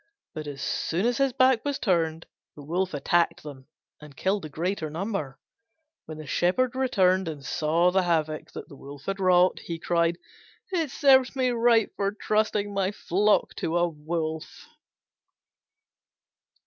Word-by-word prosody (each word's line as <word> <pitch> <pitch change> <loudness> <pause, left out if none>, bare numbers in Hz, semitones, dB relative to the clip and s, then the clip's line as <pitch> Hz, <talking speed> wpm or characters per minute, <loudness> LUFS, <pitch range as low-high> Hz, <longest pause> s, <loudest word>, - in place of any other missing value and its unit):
But 155 -1 -6
as 140 -1 -6
soon 175 +6 -1
as 245 +1 +1
his 275 -1 +3
back 255 -2 +3
was 285 -1 -1
turned 165 -5 0 0.3
the 145 - -11
Wolf 180 +5 -1
attacked 170 +4 +1
them 135 -3 -10 0.3
and 150 -2 -13
killed 195 +2 0
the 155 - -7
greater 165 +2 -3
number. 160 -5 -4 0.7
When 155 - -8
the 155 - -8
Shepherd 235 - +1
returned 190 -8 +2
and 145 -4 -6
saw 165 +3 +2
the 190 +1 +3
havoc 155 -3 -1
he - - -7 0.5
had 195 0 -2
wrought, 185 -1 +4
he 170 - -6
cried, 170 0 +1 0.5
"It 330 -5 0
serves 265 -1 +4
me 260 -1 +1
right 230 -2 +3
for 200 0 0
trusting 210 -1 0
my 195 -1 0
flock 205 +1 +1
to 165 +2 -1
a 175 0 +3
Wolf." 160 0 -5
180 Hz, 150 wpm, -26 LUFS, 160-215 Hz, 0.7 s, wrought